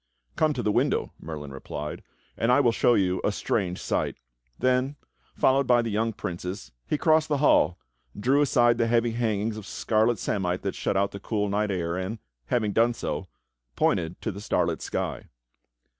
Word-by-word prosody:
"Come 155 Hz, -1 st, +2 dB
to 125 Hz, -, -3 dB
the 105 Hz, -, +2 dB
window," -, -, +1 dB
Merlin 75 Hz, -3 st, -7 dB
replied, 75 Hz, +2 st, -6 dB, 0.3 s
"and 115 Hz, +2 st, +1 dB
I 125 Hz, -, +5 dB
will 125 Hz, -5 st, +4 dB
show 120 Hz, +1 st, +3 dB
you 95 Hz, -1 st, +1 dB
a -, -, +2 dB
strange 95 Hz, -3 st, -1 dB
sight." -, -, -1 dB, 0.4 s
Then, 130 Hz, +2 st, +1 dB, 0.4 s
followed 135 Hz, 0 st, +3 dB
by 120 Hz, -1 st, +4 dB
the 115 Hz, -, -3 dB
young 110 Hz, +2 st, 0 dB
princes, 90 Hz, -1 st, -6 dB, 0.2 s
be -, -, +1 dB
crossed 155 Hz, 0 st, +3 dB
the 145 Hz, -, +2 dB
hall, 135 Hz, -, +4 dB, 0.4 s
drew 135 Hz, +7 st, +3 dB
aside 120 Hz, -4 st, +3 dB
the 115 Hz, -, +3 dB
heavy 115 Hz, 0 st, +2 dB
hangings 110 Hz, -2 st, -1 dB
of 105 Hz, -1 st, -8 dB
scarlet 110 Hz, +1 st, +1 dB
samite 90 Hz, -2 st, -1 dB
that 95 Hz, -, -1 dB
shut 95 Hz, -, -1 dB
out 100 Hz, 0 st, +1 dB
the 100 Hz, -, -7 dB
cool 105 Hz, 0 st, -1 dB
night 105 Hz, +1 st, 0 dB
air, 85 Hz, -2 st, -1 dB
and, 95 Hz, +5 st, -3 dB, 0.3 s
having 110 Hz, -4 st, +1 dB
done 120 Hz, +1 st, +3 dB
so, -, -, -4 dB, 0.5 s
pointed 85 Hz, 0 st, 0 dB
to 110 Hz, -, -1 dB
the 100 Hz, +1 st, -8 dB
starlit -, -, 0 dB
sky. -, -, -3 dB
110 Hz, 180 wpm, -26 LUFS, 95-120 Hz, 0.5 s, I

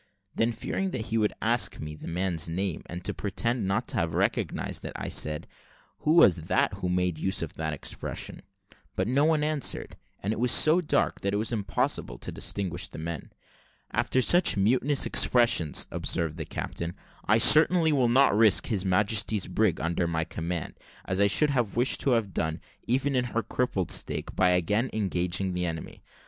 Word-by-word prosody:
Then 115 Hz, +1 st, +1 dB
fearing 190 Hz, -, -3 dB
he 110 Hz, -3 st, -2 dB
would 105 Hz, -1 st, 0 dB
ask 115 Hz, +1 st, +1 dB
me 75 Hz, 0 st, -6 dB
the 75 Hz, -, -10 dB
man's 85 Hz, -2 st, -1 dB
name, 90 Hz, +1 st, -3 dB
and 90 Hz, +1 st, -8 dB
to -, -, -1 dB
pretend 110 Hz, +2 st, -2 dB
not 110 Hz, +5 st, -1 dB
to -, -, -3 dB
have 85 Hz, -2 st, -1 dB
recognised 100 Hz, 0 st, -2 dB
it, -, -, -6 dB
I -, -, -5 dB
said, 75 Hz, 0 st, -1 dB, 0.5 s
"Who 155 Hz, -, +1 dB
was 135 Hz, -, +6 dB
that -, -, +1 dB
who 90 Hz, -, -4 dB
made 90 Hz, -3 st, -1 dB
use 95 Hz, 0 st, 0 dB
of 80 Hz, -, -7 dB
that 80 Hz, -1 st, -4 dB
expression?" 75 Hz, -, -5 dB, 0.5 s
But -, -, -1 dB
no 135 Hz, +5 st, +2 dB
one 155 Hz, -2 st, +2 dB
answered; 150 Hz, -3 st, -1 dB, 0.3 s
and 105 Hz, +3 st, -1 dB
it 110 Hz, -, -6 dB
was 125 Hz, 0 st, +2 dB
so 155 Hz, +6 st, +5 dB
dark 155 Hz, -, 0 dB
that 100 Hz, +1 st, -1 dB
it -, -, +1 dB
was 110 Hz, +3 st, -1 dB
impossible 100 Hz, -, -1 dB
to -, -, -6 dB
distinguish 95 Hz, -4 st, -2 dB
the -, -, -12 dB
men. 80 Hz, -1 st, -6 dB, 0.6 s
"After 130 Hz, -, +1 dB
such 175 Hz, -, +4 dB
mutinous 130 Hz, +8 st, +2 dB
expressions," 115 Hz, -, +3 dB
observed 80 Hz, -2 st, -1 dB
the 80 Hz, -, -4 dB
captain, 85 Hz, +3 st, -5 dB, 0.3 s
"I 105 Hz, -, +3 dB
certainly 160 Hz, +6 st, +6 dB
will 130 Hz, -5 st, +2 dB
not 130 Hz, -2 st, +4 dB
risk 110 Hz, -1 st, +4 dB
His 105 Hz, -6 st, -1 dB
Majesty's 105 Hz, +2 st, +1 dB
brig 95 Hz, 0 st, 0 dB
under 85 Hz, +1 st, -1 dB
my 80 Hz, -1 st, -1 dB
command, 85 Hz, +1 st, -5 dB, 0.3 s
as 95 Hz, 0 st, -2 dB
I 100 Hz, -, +4 dB
should 145 Hz, +9 st, +2 dB
have 120 Hz, -7 st, -1 dB
wished 125 Hz, +2 st, +2 dB
to 135 Hz, -, +1 dB
have 110 Hz, -5 st, -1 dB
done, 80 Hz, 0 st, -2 dB, 0.3 s
even 135 Hz, +3 st, 0 dB
in 125 Hz, -1 st, +1 dB
her 115 Hz, -1 st, -2 dB
crippled 100 Hz, -8 st, -2 dB
state, -, -, -2 dB
by 90 Hz, -, +3 dB
again 105 Hz, +8 st, +1 dB
engaging 95 Hz, -2 st, -1 dB
the 90 Hz, 0 st, -2 dB
enemy. 80 Hz, -1 st, -7 dB
100 Hz, 185 wpm, -27 LUFS, 85-120 Hz, 0.6 s, was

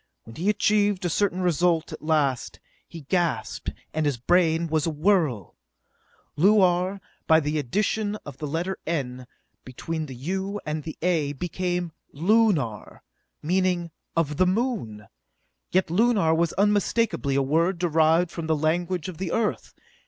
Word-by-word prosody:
When 115 Hz, -, -13 dB
he 180 Hz, +6 st, -1 dB
achieved 205 Hz, -2 st, +2 dB
a 175 Hz, -, 0 dB
certain 185 Hz, 0 st, 0 dB
result 175 Hz, -1 st, +1 dB
at -, -, -8 dB
last, 150 Hz, -5 st, 0 dB, 0.3 s
he 165 Hz, -, -10 dB
gasped, 170 Hz, +3 st, -1 dB, 0.2 s
and 155 Hz, -1 st, 0 dB
his 140 Hz, -4 st, 0 dB
brain 165 Hz, +4 st, +2 dB
was 160 Hz, -1 st, 0 dB
a -, -, +2 dB
whirl. 155 Hz, -, 0 dB, 0.8 s
Luar, 185 Hz, +1 st, +3 dB, 0.3 s
by 160 Hz, 0 st, +6 dB
the 150 Hz, 0 st, -1 dB
addition 205 Hz, -, -1 dB
of 140 Hz, -2 st, -9 dB
the 150 Hz, -, -4 dB
letter 170 Hz, +6 st, -3 dB
n, 130 Hz, -6 st, -3 dB, 0.4 s
between 155 Hz, +5 st, -5 dB
the 130 Hz, -, -8 dB
u 190 Hz, +9 st, -3 dB
and 155 Hz, 0 st, -3 dB
the 160 Hz, -, -6 dB
a, 160 Hz, -5 st, +1 dB
became 175 Hz, +2 st, -3 dB, 0.2 s
Lunar, 170 Hz, -, +1 dB, 0.4 s
meaning 180 Hz, 0 st, 0 dB, 0.2 s
"of 150 Hz, -3 st, 0 dB
the 185 Hz, -, +4 dB
Moon!" 185 Hz, -, -2 dB, 0.6 s
Yet 185 Hz, -2 st, +1 dB
Lunar 200 Hz, -4 st, +3 dB
was 165 Hz, 0 st, +1 dB
unmistakably 205 Hz, -6 st, +1 dB
a 140 Hz, -, +2 dB
word 165 Hz, +6 st, +1 dB
derived 165 Hz, 0 st, +2 dB
from 165 Hz, -2 st, -5 dB
the 160 Hz, -1 st, +1 dB
language 170 Hz, +2 st, -1 dB
of 180 Hz, -4 st, -8 dB
the 185 Hz, -3 st, -3 dB
Earth! 225 Hz, -2 st, -2 dB
170 Hz, 145 wpm, -25 LUFS, 150-185 Hz, 0.8 s, by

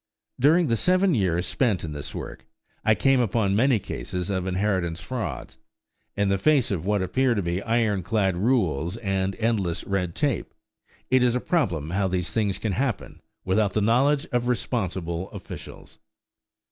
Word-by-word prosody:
During 160 Hz, +7 st, +5 dB
the 115 Hz, -, +1 dB
seven 185 Hz, -, +3 dB
years 90 Hz, -, +1 dB
spent 95 Hz, +5 st, 0 dB
in 80 Hz, -, -4 dB
this 70 Hz, -1 st, -7 dB
work, -, -, -7 dB, 0.4 s
I 110 Hz, -, +4 dB
came 135 Hz, +2 st, +3 dB
upon 110 Hz, -4 st, +1 dB
many 125 Hz, +2 st, +4 dB
cases 90 Hz, -, -4 dB
of 95 Hz, -1 st, -2 dB
inheritance 95 Hz, -3 st, 0 dB
frauds. 80 Hz, -, -5 dB, 0.6 s
In 100 Hz, 0 st, +2 dB
the 100 Hz, -1 st, +1 dB
face 140 Hz, 0 st, +3 dB
of 90 Hz, -2 st, -2 dB
what 105 Hz, -2 st, +1 dB
appear 130 Hz, +6 st, +1 dB
to 100 Hz, -, 0 dB
be 85 Hz, +2 st, -1 dB
iron 110 Hz, -4 st, +1 dB
clad 95 Hz, 0 st, 0 dB
rules 90 Hz, -, +1 dB
and 95 Hz, -3 st, -1 dB
endless 105 Hz, -7 st, 0 dB
red 90 Hz, -4 st, -2 dB
tape, 145 Hz, -5 st, -1 dB, 0.6 s
it 130 Hz, 0 st, +5 dB
is 125 Hz, -1 st, +3 dB
a -, -, +1 dB
problem 90 Hz, -, -1 dB
how 95 Hz, +1 st, +1 dB
these 90 Hz, -1 st, -2 dB
things 105 Hz, -4 st, 0 dB
can 110 Hz, -, -2 dB
happen 125 Hz, +1 st, -3 dB, 0.2 s
without 100 Hz, +1 st, +1 dB
the -, -, +1 dB
knowledge 135 Hz, +7 st, +3 dB
of 120 Hz, 0 st, 0 dB
responsible 95 Hz, -8 st, -2 dB
officials! -, -, -10 dB
100 Hz, 165 wpm, -25 LUFS, 90-120 Hz, 0.6 s, During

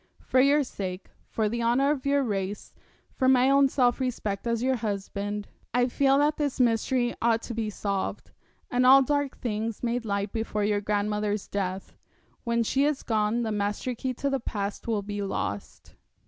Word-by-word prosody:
For 260 Hz, -, +2 dB
your 285 Hz, +2 st, +4 dB
sake, 190 Hz, -6 st, -6 dB, 0.2 s
for 220 Hz, -1 st, -1 dB
the 235 Hz, +3 st, -2 dB
honour 250 Hz, +5 st, +3 dB
of 280 Hz, -2 st, -2 dB
your 280 Hz, 0 st, +3 dB
race, 200 Hz, -3 st, -3 dB, 0.4 s
for 260 Hz, -1 st, +2 dB
my 260 Hz, +1 st, +5 dB
own 275 Hz, 0 st, +5 dB
self 250 Hz, -2 st, +2 dB
respect 235 Hz, -5 st, -2 dB
as 230 Hz, 0 st, 0 dB
your 260 Hz, 0 st, +2 dB
husband, 205 Hz, -1 st, -3 dB, 0.3 s
I 245 Hz, 0 st, +3 dB
feel 275 Hz, +2 st, +3 dB
that 295 Hz, +1 st, +2 dB
this 290 Hz, -3 st, -2 dB
mystery 240 Hz, +1 st, +2 dB
ought 230 Hz, -1 st, +2 dB
to 240 Hz, -, -5 dB
be 225 Hz, -1 st, -2 dB
solved, 200 Hz, -1 st, -3 dB, 0.4 s
and 250 Hz, 0 st, +2 dB
all 270 Hz, +2 st, +8 dB
dark 285 Hz, 0 st, -1 dB
things 225 Hz, -1 st, -3 dB
made 240 Hz, 0 st, -1 dB
light 200 Hz, -2 st, -2 dB
before 220 Hz, -2 st, -2 dB
your 205 Hz, 0 st, +1 dB
grandmother's 210 Hz, 0 st, -1 dB
death. 190 Hz, -1 st, -4 dB, 0.5 s
When 235 Hz, -1 st, +1 dB
she 270 Hz, +5 st, +1 dB
is 295 Hz, -1 st, 0 dB
gone 220 Hz, +1 st, +1 dB
the 220 Hz, -, -2 dB
master 210 Hz, +4 st, -2 dB
key 255 Hz, +2 st, -3 dB
to 280 Hz, -, -1 dB
the 270 Hz, -, 0 dB
past 205 Hz, -3 st, -4 dB
will 215 Hz, -3 st, 0 dB
be 205 Hz, 0 st, -4 dB
lost.' 100 Hz, -, -4 dB
230 Hz, 180 wpm, -27 LUFS, 205-260 Hz, 0.5 s, all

